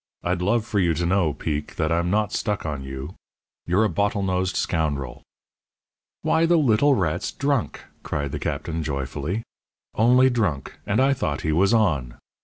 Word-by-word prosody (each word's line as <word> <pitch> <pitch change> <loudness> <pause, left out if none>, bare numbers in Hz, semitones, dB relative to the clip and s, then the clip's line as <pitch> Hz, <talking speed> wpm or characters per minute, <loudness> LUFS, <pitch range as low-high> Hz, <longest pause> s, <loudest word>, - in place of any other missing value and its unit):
"I'd 90 0 -1
love 110 +4 +1
for 110 -3 -1
you 85 -3 +2
to 85 +3 -1
know, 90 -3 +2
Peek, 75 0 -4
that 80 0 0
I'm 85 +1 +1
not 105 +1 +1
stuck 105 -5 -2
on 70 -3 -3
you. 65 +4 -7 0.5
You're 95 +5 +3
a - - +4
bottle 100 0 0
nosed 95 0 0
scoundrel." 70 -6 -1 1.0
"Why, 165 +1 +3
the 170 0 +4
little 140 0 +4
rat's 85 -4 -1
drunk!" 140 - -1 0.2
cried 70 -1 -3
the - - -4
Captain, 80 +3 -3
joyfully; 75 - -3 0.5
"only 125 +4 +5
drunk, 90 - -2
and 100 - +1
I 135 +1 +4
thought 75 - -2
he 80 - 0
was 95 +6 +3
on! 75 - +1
90 Hz, 170 wpm, -24 LUFS, 75-110 Hz, 1.0 s, only